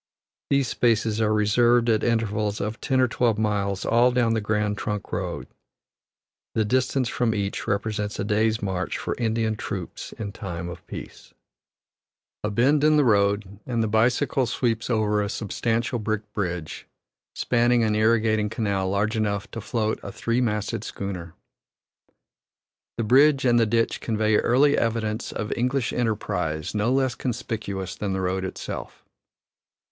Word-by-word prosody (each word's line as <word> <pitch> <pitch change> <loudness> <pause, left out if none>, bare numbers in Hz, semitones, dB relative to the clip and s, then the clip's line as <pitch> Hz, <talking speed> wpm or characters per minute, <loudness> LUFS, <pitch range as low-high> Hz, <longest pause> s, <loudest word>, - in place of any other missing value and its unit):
These 140 -2 +2
spaces 115 -2 +1
are 110 -1 +2
reserved 120 +3 +3
at 110 -2 +2
intervals 110 -3 0
of 105 +3 -4
ten 130 -1 +1
or 130 - +4
twelve 120 -2 +1
miles 100 -3 -1
all 120 +2 +4
down 120 -2 +2
the 110 - 0
Grand 105 0 0
Trunk 105 0 -4
Road; - - -3 1.1
the 110 - +2
distance 130 +2 +1
from 115 -1 0
each 100 -1 -3
represents 105 0 -1
a - - -1
day's 110 +1 +1
march 95 -2 -2
for - - -3
Indian 110 -1 0
troops 95 -4 -6
in 105 -2 -5
time 85 -4 -6
of 85 -1 -9
peace. - - -10 1.1
A 105 - 0
bend 135 +7 +3
in 155 0 +5
the 145 - +4
road, 100 -2 +2
and 120 -3 0
the - - 0
bicycle 125 +4 +2
sweeps 115 -1 -1
over 105 -3 +2
a 100 - -2
substantial 115 +3 -1
brick 105 -1 -3
bridge, 90 -5 -4 0.5
spanning 120 0 +2
an 110 -1 +2
irrigating 110 -1 +2
canal 100 -4 -1
large 105 +3 0
enough 105 -2 -1
to 115 - -5
float 110 -2 -1
a 100 - -7
three 115 +4 -1
masted 105 -4 -1
schooner. 90 -4 -6 1.6
The 115 - 0
bridge 135 +4 +5
and 120 -1 +4
the 115 - +3
ditch 115 +1 0
convey 110 -1 +1
early 140 +4 +4
evidence 115 -1 -1
of 105 0 -3
English 125 0 0
enterprise 90 -9 -1
no 105 +3 +1
less 130 -1 +2
conspicuous 110 -7 -4
than 100 -2 -3
the 95 - -1
road 95 +1 -1
itself. 95 - -6
110 Hz, 150 wpm, -25 LUFS, 105-120 Hz, 1.6 s, in